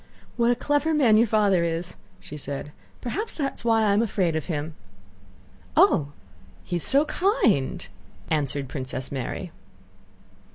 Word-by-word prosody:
"What 235 Hz, 0 st, +2 dB
a 245 Hz, -, +4 dB
clever 290 Hz, +5 st, +1 dB
man 250 Hz, -8 st, +5 dB
your 230 Hz, +2 st, +5 dB
father 205 Hz, -5 st, +3 dB
is," 170 Hz, +1 st, -3 dB, 0.3 s
said 140 Hz, -1 st, -5 dB
she; 150 Hz, -, -13 dB, 0.3 s
"perhaps 415 Hz, -, -3 dB
that 275 Hz, -3 st, -1 dB
is -, -, -9 dB
why 225 Hz, -1 st, +3 dB
I 205 Hz, -2 st, +3 dB
am 205 Hz, -, +3 dB
afraid 190 Hz, -7 st, 0 dB
of 160 Hz, -, -3 dB
him." 155 Hz, -2 st, -3 dB, 1.0 s
"Oh, 140 Hz, -, +5 dB, 0.6 s
he 175 Hz, -, -2 dB
is 170 Hz, -, -3 dB
so 280 Hz, +3 st, +3 dB
kind!" 295 Hz, -, +1 dB, 0.4 s
answered 145 Hz, -3 st, -1 dB
Princess 130 Hz, -1 st, -5 dB
Mary. 130 Hz, -4 st, -4 dB
195 Hz, 150 wpm, -25 LUFS, 150-240 Hz, 1.0 s, man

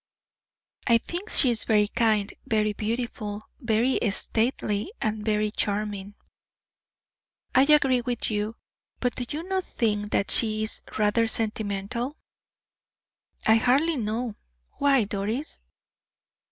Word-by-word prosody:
"I 235 Hz, -2 st, +6 dB
think 350 Hz, -, -6 dB
she 255 Hz, -, +5 dB
is 230 Hz, -, +5 dB
very 210 Hz, -2 st, +3 dB
kind, 215 Hz, -2 st, +1 dB
very 215 Hz, -1 st, +1 dB
beautiful, 215 Hz, -1 st, -3 dB, 0.2 s
very 235 Hz, 0 st, +1 dB
stately, 220 Hz, -, -1 dB
and 215 Hz, -1 st, -2 dB
very 210 Hz, -1 st, +1 dB
charming." 205 Hz, -1 st, -3 dB, 1.4 s
"I 265 Hz, +2 st, +5 dB
agree 270 Hz, -4 st, +4 dB
with 240 Hz, -1 st, -2 dB
you; 210 Hz, +1 st, -2 dB, 0.4 s
but 245 Hz, -1 st, -1 dB
do 250 Hz, -, -3 dB
you 310 Hz, +3 st, -4 dB
not 375 Hz, +1 st, -1 dB
think 210 Hz, -7 st, -1 dB
that 200 Hz, -, 0 dB
she 215 Hz, -2 st, +3 dB
is 215 Hz, -, -3 dB, 0.2 s
rather 215 Hz, +2 st, +2 dB
sentimental?" 220 Hz, +4 st, -2 dB, 1.3 s
"I 220 Hz, +1 st, +6 dB
hardly 275 Hz, +8 st, +3 dB
know. 225 Hz, 0 st, -2 dB, 0.5 s
Why, 275 Hz, -4 st, +4 dB
Doris?" 210 Hz, +8 st, -3 dB
220 Hz, 115 wpm, -26 LUFS, 210-250 Hz, 1.4 s, I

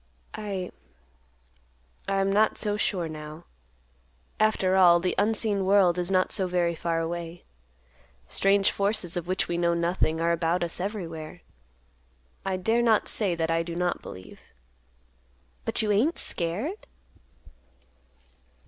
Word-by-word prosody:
I—I 195 Hz, -4 st, -4 dB, 1.5 s
am 195 Hz, 0 st, +1 dB
not 215 Hz, +1 st, +3 dB
so 205 Hz, -1 st, 0 dB
sure 185 Hz, -4 st, -1 dB
now. 155 Hz, +1 st, -8 dB, 1.0 s
After 215 Hz, -3 st, +2 dB
all, 175 Hz, -2 st, +6 dB
the 180 Hz, +1 st, -1 dB
unseen 210 Hz, -2 st, +1 dB
world 190 Hz, -2 st, +4 dB
is 175 Hz, 0 st, -1 dB
not 185 Hz, -1 st, +2 dB
so 190 Hz, -3 st, +1 dB
very 175 Hz, -1 st, +1 dB
far 165 Hz, 0 st, -2 dB
away. 170 Hz, +1 st, -5 dB, 0.8 s
Strange 195 Hz, 0 st, +2 dB
forces, 200 Hz, -3 st, -1 dB
of 175 Hz, -1 st, -3 dB
which 185 Hz, +1 st, 0 dB
we 170 Hz, 0 st, -2 dB
know 170 Hz, 0 st, +2 dB
nothing, 170 Hz, -1 st, 0 dB
are 170 Hz, +1 st, +2 dB
about 170 Hz, +1 st, 0 dB
us 170 Hz, 0 st, -3 dB
everywhere. 175 Hz, -4 st, -5 dB, 1.0 s
I 190 Hz, -1 st, -1 dB
dare 225 Hz, +6 st, +1 dB
not 225 Hz, -3 st, +3 dB
say 195 Hz, -6 st, +1 dB
that 165 Hz, -1 st, -1 dB
I 165 Hz, 0 st, +2 dB
do 165 Hz, 0 st, -5 dB
not 175 Hz, 0 st, -1 dB
believe." 95 Hz, 0 st, -11 dB, 1.3 s
"But -, -, -1 dB
you 210 Hz, -, +1 dB
ain't 245 Hz, -, +2 dB
scared?" 210 Hz, -, -1 dB
180 Hz, 130 wpm, -26 LUFS, 170-200 Hz, 1.5 s, all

